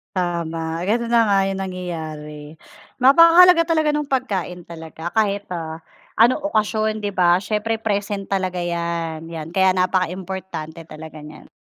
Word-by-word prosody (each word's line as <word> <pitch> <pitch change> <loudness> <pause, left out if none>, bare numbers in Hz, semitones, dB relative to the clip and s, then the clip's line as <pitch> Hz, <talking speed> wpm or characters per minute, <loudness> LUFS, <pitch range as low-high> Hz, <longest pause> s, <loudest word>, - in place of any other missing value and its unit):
Tama, 165 -2 -2
gano'n 235 +2 0
na 235 -1 +5
nga, 200 -1 +3
'yung 195 0 -3
nangyayari. 155 -5 -7 0.5
Napakahalaga 335 +6 +7
talaga 315 -2 +2
ng 295 -1 -2
pagkain 195 -10 -2
talaga 165 0 -8
kahit, 205 -2 0
ah, 165 -2 -5 0.4
anong 245 +6 +4
okasyon, 215 -2 0
'di 205 - -1
ba? 175 -2 +3
Siyempre 215 +1 -1
present 205 -2 -2
talaga 185 -2 -1
'yan 170 -2 -3
'yan 165 -1 -7
kaya 190 0 +3
napakaimportante 185 -3 -3
talaga 155 0 -10
niyan. 150 +1 -12
185 Hz, 135 wpm, -21 LUFS, 165-215 Hz, 0.5 s, Napakahalaga